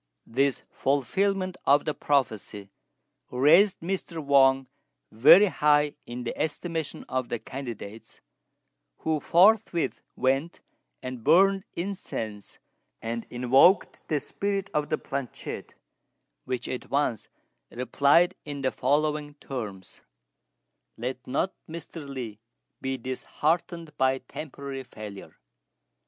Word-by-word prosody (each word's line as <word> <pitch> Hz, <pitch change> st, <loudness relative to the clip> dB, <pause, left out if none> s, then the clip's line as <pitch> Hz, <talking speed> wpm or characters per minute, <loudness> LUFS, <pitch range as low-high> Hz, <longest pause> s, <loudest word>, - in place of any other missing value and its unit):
This 135 Hz, +3 st, 0 dB
fulfilment 185 Hz, -, 0 dB
of 145 Hz, +1 st, +5 dB
the 150 Hz, -, 0 dB
prophecy 110 Hz, -9 st, -1 dB, 0.6 s
raised 165 Hz, +10 st, +5 dB
Mr. 175 Hz, -1 st, -3 dB
Wang 135 Hz, -3 st, +4 dB, 0.5 s
very 140 Hz, -, +8 dB
high 150 Hz, -5 st, +3 dB
in 120 Hz, +1 st, -5 dB
the 120 Hz, -, -4 dB
estimation 160 Hz, 0 st, -3 dB
of 130 Hz, -1 st, -2 dB
the 120 Hz, -, -1 dB
candidates, 115 Hz, -4 st, -8 dB, 0.8 s
who 160 Hz, -1 st, 0 dB
forthwith 185 Hz, +1 st, +3 dB
went 135 Hz, +6 st, 0 dB, 0.4 s
and 125 Hz, -2 st, -6 dB
burned 195 Hz, -, +5 dB
incense 115 Hz, -, -5 dB, 0.4 s
and 115 Hz, 0 st, -4 dB
invoked 130 Hz, +10 st, +3 dB
the 150 Hz, -, +1 dB
spirit 200 Hz, +6 st, -3 dB
of 150 Hz, -1 st, 0 dB
the 155 Hz, -, +1 dB
planchette, 135 Hz, -3 st, -6 dB, 0.7 s
which 125 Hz, -1 st, -3 dB
at 125 Hz, -, -5 dB
once 135 Hz, -6 st, 0 dB, 0.4 s
replied 140 Hz, +7 st, +3 dB
in 145 Hz, -2 st, -6 dB
the 130 Hz, -, +2 dB
following 150 Hz, +2 st, 0 dB
terms: 105 Hz, -10 st, -7 dB, 1.0 s
"Let 125 Hz, +2 st, -5 dB
not 140 Hz, +8 st, 0 dB, 0.2 s
Mr. 160 Hz, -2 st, -8 dB
Li 120 Hz, -6 st, -6 dB, 0.4 s
be 130 Hz, 0 st, -2 dB
disheartened 155 Hz, +6 st, -2 dB
by 130 Hz, 0 st, +3 dB
temporary 140 Hz, -1 st, -7 dB
failure. 105 Hz, -5 st, -10 dB
140 Hz, 105 wpm, -27 LUFS, 125-165 Hz, 1.0 s, very